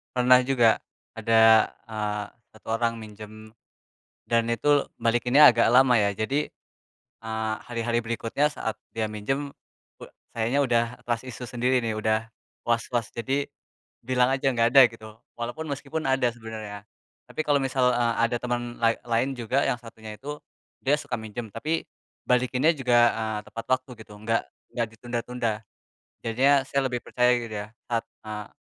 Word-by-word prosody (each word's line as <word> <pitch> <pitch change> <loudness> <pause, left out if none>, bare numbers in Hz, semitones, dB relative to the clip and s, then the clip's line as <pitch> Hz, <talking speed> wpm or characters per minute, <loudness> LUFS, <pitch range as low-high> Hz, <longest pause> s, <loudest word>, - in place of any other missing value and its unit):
Pernah 125 0 +6
juga, 120 -4 +4 0.4
ada, 110 -1 +5 0.2
eee, 105 -1 -2 0.3
1 110 - -19
orang 115 0 0
minjem 110 0 -11 0.8
dan 115 -1 +3
itu 145 +5 +2
balikinnya 125 +5 +6
agak 115 -1 +3
lama 130 -1 +6
ya. 100 -1 +2
Jadi, 135 +9 -1 0.7
eee, 110 -1 -2
hari-hari 120 0 -1
berikutnya 115 +5 0
saat 115 -6 -4 0.2
dia 110 -1 0
minjem, 135 +7 -3 0.5
uda - - -11 0.2
kayaknya 115 +4 0
udah 120 -2 +3 0.2
trust 120 0 -2
issue 125 0 -7
sendiri 125 +1 +1
nih, 115 -1 -1
udah 110 +1 0 0.4
was-was. 115 0 0
Jadi 135 +4 -1 0.6
bilang 125 0 +2
aja 135 0 +1
enggak 115 -2 +3
ada 135 - +11
gitu 110 -1 -11 0.3
walaupun 120 +7 -4
meskipun 140 +3 -4
ada 130 -2 +2
sebenarnya. 110 -3 -8 0.4
Tapi - - -12
kalau 145 - +4
misal 130 -2 +2
e 120 - +1 0.2
ada 115 +1 +2
temen 120 0 -3
lai 115 0 +3
lain 120 +3 0
juga 130 +2 0
yang 120 - 0
satunya 110 -2 -11
itu 145 +2 -7 0.4
dia 145 +3 +2
suka - - -4
minjem 110 +1 -6
tapi 150 +10 -3 0.4
balikinnya 125 +5 +2
juga, 125 -4 +2 0.2
eee, 110 -1 -2
tepat 115 - -7
waktu 130 - -26
gitu 105 - -19
nggak 115 +1 0 0.3
nggak 120 -2 0
ditunda-tunda. 120 +1 -3 0.8
Jadinya 130 +5 +3
saya 140 - 0
lebih 125 - -1
percaya 125 0 +2
gitu 115 -2 -6
ya 105 0 -5 0.2
saat, 115 -1 -1 0.2
eee, 105 -1 -5
120 Hz, 150 wpm, -26 LUFS, 110-130 Hz, 0.8 s, ada